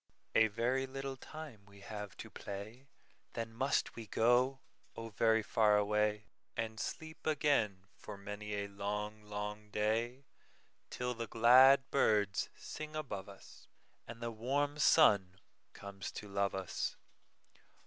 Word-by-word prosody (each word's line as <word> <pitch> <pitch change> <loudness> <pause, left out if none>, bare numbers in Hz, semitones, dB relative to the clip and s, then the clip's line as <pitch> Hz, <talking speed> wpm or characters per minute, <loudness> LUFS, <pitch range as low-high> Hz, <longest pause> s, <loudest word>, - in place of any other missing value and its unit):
"A 110 0 +6
very 125 +5 0
little 135 0 -5
time 140 -5 -10
we 100 0 -16
have 105 -1 -7
to - - -9
play, 110 +7 -8 0.5
Then 115 -1 -4
must 135 +4 0
we 115 -2 -8
go, 125 +5 +3 0.3
oh, 115 0 -6
very 110 +1 +3
far 105 -1 +4
away, 105 +1 +1 0.3
And 110 -1 -3
sleep 160 0 -6
again 135 -11 +1
for 105 - -9
many 105 +1 -5
a 100 0 -2
long, 105 +2 -4
long 105 0 -6
day, 115 +6 -1 0.6
Till 125 0 -2
the 115 -1 -5
glad 130 +5 +7
birds 105 -7 +2
sing 155 0 -7
above 120 -11 -5
us, 100 - -14 0.4
And 115 0 -8
the 115 - -2
warm 140 +6 -1
sun 100 - +5 0.4
comes 100 -1 -7
to 105 - -7
love 100 0 0
us. 95 -5 -3
110 Hz, 135 wpm, -35 LUFS, 105-130 Hz, 0.6 s, glad